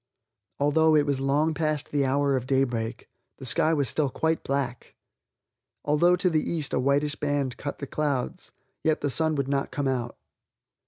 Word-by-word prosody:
Although 155 +2 +4
it 150 -1 +4
was 140 -2 0
long 145 +4 +2
past 155 -2 -1
the 145 -2 +1
hour 140 +1 +2
of 130 -1 -3
daybreak, 120 -4 -1 0.3
the 135 - -9
sky 130 +6 +2
was 145 -4 +1
still 145 +1 +1
quite 160 +5 -1
black. 135 -3 -3 0.9
Although 160 +5 +4
to 180 +1 +1
the 155 -1 +2
east 160 -5 -2
a - - +2
whitish 140 +3 +2
band 145 -3 -1
cut 145 - -5
the 140 - -5
clouds, 140 -2 -2 0.3
yet 155 -1 +1
the 145 - 0
sun 160 +2 +2
would 140 -2 -1
not 140 0 -1
come 145 -2 -2
out. 125 -3 -2
145 Hz, 175 wpm, -26 LUFS, 135-155 Hz, 0.9 s, Although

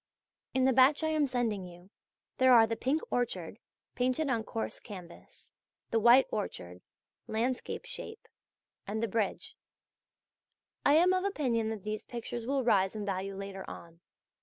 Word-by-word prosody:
In 260 0 +3
the 265 - +4
batch 265 +5 +5
I 315 - +1
am 305 -2 +2
sending 235 -6 -1
you 175 +2 -15 0.5
there 260 -1 +6
are 230 -2 +8
the 225 0 -2
"Pink 270 +7 0
Orchard," 210 -5 -2 0.3
painted 255 +4 0
on 230 -3 0
coarse 225 0 -4
canvas, 180 -5 -12 0.4
the 230 - +3
"White 240 +4 +7
Orchard" 90 - -5 0.5
(landscape 245 - -2
shape); 485 -3 -8 0.6
and 220 +3 -2
the - - +1
"Bridge." 215 -1 -2 1.3
I 285 - +5
am 355 +3 +5
of 370 0 +1
opinion 250 - 0
that 220 -3 -5
these 215 0 -4
pictures 235 0 -6
will 270 0 +1
rise 200 -4 +2
in 210 -1 -4
value 195 0 -3
later 195 0 -6
on. 165 0 -11
230 Hz, 155 wpm, -31 LUFS, 200-260 Hz, 1.3 s, are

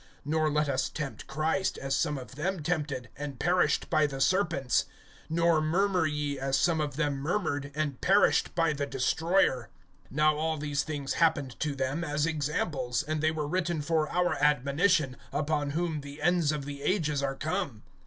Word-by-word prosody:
(9)Nor 155 +1 +1
let 150 0 +1
us 135 -1 0
tempt 145 -4 -6
Christ, 160 +7 0
as 135 0 -1
some 150 -3 0
of 130 0 -9
them 170 +4 -2
tempted, 145 -7 -2
and 140 -2 -6
perished 175 +1 +2
by 155 -2 +4
the 135 -1 -6
serpents. 160 -4 +2 0.5
(10)Nor 170 -1 +3
murmur 180 +1 +2
ye, 145 -2 -2
as 135 0 +1
some 160 +2 +2
of 145 -2 -3
them 145 -2 0
murmured, 145 -2 -2
and 150 -4 -2
perished 200 +2 +3
by 165 -2 +2
the 140 -1 -2
destroyer. 135 - +1 0.4
(11)Now 150 +2 +3
all 160 +1 -1
these 145 -1 -1
things 145 -2 -3
happened 145 -6 +2
to 150 -2 -1
them 135 +5 -1
as 150 -1 0
examples, 150 -5 -1
and 155 0 -2
they 155 - +3
were 155 -2 -2
written 175 0 -1
for 155 0 +1
our 180 0 +1
admonition, 145 +1 +2
upon 150 -1 0
whom 165 -3 -1
the 145 +1 -10
ends 170 -1 +2
of 150 -2 -3
the 140 0 -7
ages 150 -3 0
are 135 -1 -1
come. 155 - -3
150 Hz, 175 wpm, -29 LUFS, 140-165 Hz, 0.5 s, by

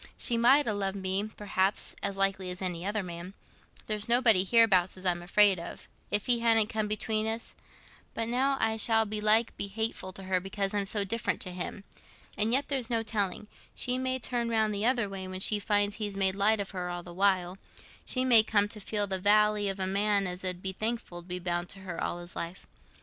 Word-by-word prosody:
She 240 - +3
might 260 +5 +5
ha' 225 - +1
loved 195 -1 -2
me, 190 +1 -1
perhaps, 200 -2 -1
as 195 - -2
likely 195 -1 0
as 180 0 -4
any 180 -2 -3
other 205 +1 -2
man—there's 185 +4 -8
nobody 235 -6 +5
hereabouts 195 -4 +3
as 185 - -10
I'm 175 -1 0
afraid 195 +1 +4
of, 170 - -9 0.2
if 205 -1 +2
he 240 -1 +2
hadn't 225 -2 +3
come 215 -1 -2
between 215 +1 -1
us; 225 +1 -3 0.6
but 225 0 -1
now 265 +3 +1
I 220 0 +1
shall 225 0 +2
belike 215 +2 +2
be 200 - -3
hateful 215 -2 -3
to 195 - -9
her 185 -1 0
because 195 +1 -3
I'm 200 -1 0
so 205 0 +2
different 225 +3 -2
to 185 - -3
him. 180 +2 -6 0.5
And 215 +2 +3
yet 275 +3 +2
there's 260 -4 -2
no 230 -2 +1
telling—she 215 +4 -3
may 260 0 -1
turn 240 -1 -2
round 220 -2 +1
the 205 +3 0
other 245 -4 +2
way, 195 -1 -6
when 185 0 -6
she 210 +2 +1
finds 205 0 +1
he's 205 -2 -4
made 190 -1 +3
light 205 +2 +2
of 200 - -4
her 180 -2 -4
all 175 0 -5
the 175 - -11
while. 185 -1 0 0.4
She 255 0 0
may 235 -3 +8
come 210 -2 +2
to 210 - -4
feel 205 0 -1
the 190 -1 -3
vally 210 +1 +3
of 195 0 -4
a 190 - 0
man 200 +1 +1
as 180 0 -5
'ud 185 -1 -2
be 190 - -1
thankful 215 -4 -4
to 170 - -19
be 180 0 -4
bound 175 0 -3
to 195 - -7
her 180 -3 -5
all - - -3
his 175 0 -8
life. 170 +2 -6
205 Hz, 215 wpm, -29 LUFS, 190-225 Hz, 0.6 s, may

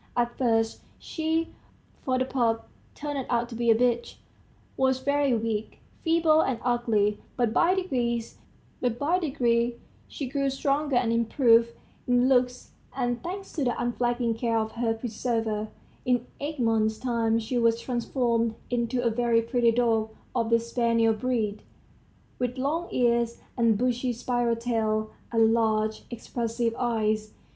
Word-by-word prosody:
At 240 0 +1
first 225 -3 +1 0.2
she 320 0 -2 0.5
for 255 -1 0
the 255 - +1
pup 235 -4 0 0.3
turned 290 -2 -3
out 235 -1 +1
to - - -8
be 235 0 0
a 225 - +7
bitch 240 0 +1 0.6
was 265 -1 +2
very 280 -1 +2
weak, 220 -1 -3 0.3
feeble, 325 -1 +4
and 260 -6 0
ugly, 225 -4 +1 0.2
but 240 -3 +1
by 335 - +4
degrees 240 -11 -2 1.7
she 275 - -5
grew 275 +1 0
stronger 280 +1 0
and 240 -2 +2
improved 230 0 +3 0.3
in 245 0 +3
looks, 250 -1 +1 0.2
and, 245 -2 -1
thanks 385 +3 -6
to 295 - -1
the 245 -2 0
unflagging 240 -1 0
care 230 0 0
of 220 0 -1
her 230 -1 -1
preserver, 225 -2 -2 0.4
in 245 -1 +1
eight 295 +1 -4
months' 220 -2 +2
time 230 -2 +1
she 230 +2 -1
was 230 0 +3
transformed 235 -2 0 0.2
into 245 +1 0
a 235 - +2
very 230 0 +2
pretty 235 0 +2
dog 225 -2 +2 0.3
of 230 -2 +1
the 230 0 +4
spaniel 230 -1 +2
breed, 220 -2 -1 0.8
with 250 +1 -2
long 310 +6 -1
ears, 235 -1 +1 0.2
a - - -4
bushy 245 +3 +2
spiral 240 0 0
tail, 220 -2 -1 0.2
and 225 -1 +4
large, 220 -1 0
expressive 235 0 -2
eyes. 215 -3 -1
235 Hz, 140 wpm, -27 LUFS, 225-255 Hz, 1.7 s, a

